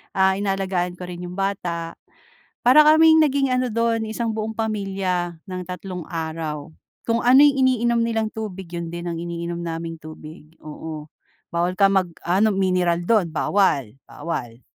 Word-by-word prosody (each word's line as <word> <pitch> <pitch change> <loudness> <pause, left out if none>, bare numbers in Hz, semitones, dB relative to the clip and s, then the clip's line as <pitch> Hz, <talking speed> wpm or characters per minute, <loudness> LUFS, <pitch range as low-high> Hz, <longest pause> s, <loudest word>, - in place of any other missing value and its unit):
ah, 190 0 +3
inaalagaan 190 -3 -1
ko 180 - -9
rin 180 -1 -7
'yong 180 - -8
bata, 175 -4 -3 0.7
para 260 +5 +8
kaming 315 +1 +6
naging 275 -3 +2
ano 255 -1 0
dun 230 0 0
isang 220 +1 -3
buong 220 0 -3
pamilya 195 -5 -2
ng 185 -1 -5
tatlong 180 0 -6
araw. 160 -2 -5 0.3
Kung 230 +1 +1
ano 255 +3 +7
yung 290 -1 +6
iniinom 235 -2 +2
nilang 225 -1 0
tubig 200 -5 -7
yun 170 -1 -5
din 170 0 -5
ang 170 - -3
iniinom 170 0 -4
naming 165 0 -4
tubig, 155 0 -12
oo, 155 0 -8 0.4
bawal 170 +1 0
ka 195 +2 +4
mag-ano 190 +2 +1
mineral 180 -3 +1
dun, 175 -2 +1
bawal, 145 - +1
bawal. 120 -8 -6
185 Hz, 150 wpm, -22 LUFS, 170-220 Hz, 0.7 s, para